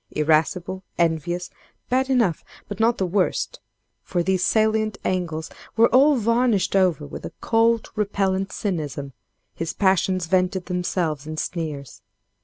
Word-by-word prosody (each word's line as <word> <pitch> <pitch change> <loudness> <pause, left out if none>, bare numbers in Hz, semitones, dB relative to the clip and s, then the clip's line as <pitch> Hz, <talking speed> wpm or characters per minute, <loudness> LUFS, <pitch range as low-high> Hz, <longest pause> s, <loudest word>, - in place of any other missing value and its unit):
Irascible, 160 +4 +1 0.2
envious—bad 175 - -2
enough, 230 - +2 0.2
but 205 - -7
not 230 +2 +3
the 190 - 0
worst, 185 +1 0 0.4
for 175 -2 -1
these 185 0 +1
salient 215 -1 +2
angles 165 -4 -2 0.3
were 230 +1 +6
all 280 +3 +5
varnished 230 -3 +1
over 180 -6 +2
with 145 - -8
a - - -6
cold, 230 0 +2
repellant 195 -2 0
cynicism, 145 - -3 0.4
his 165 -1 -4
passions 190 -2 +2
vented 185 +1 +1
themselves 175 -5 -2
in 155 0 -5
sneers. 150 -7 -5
185 Hz, 125 wpm, -23 LUFS, 165-215 Hz, 0.4 s, were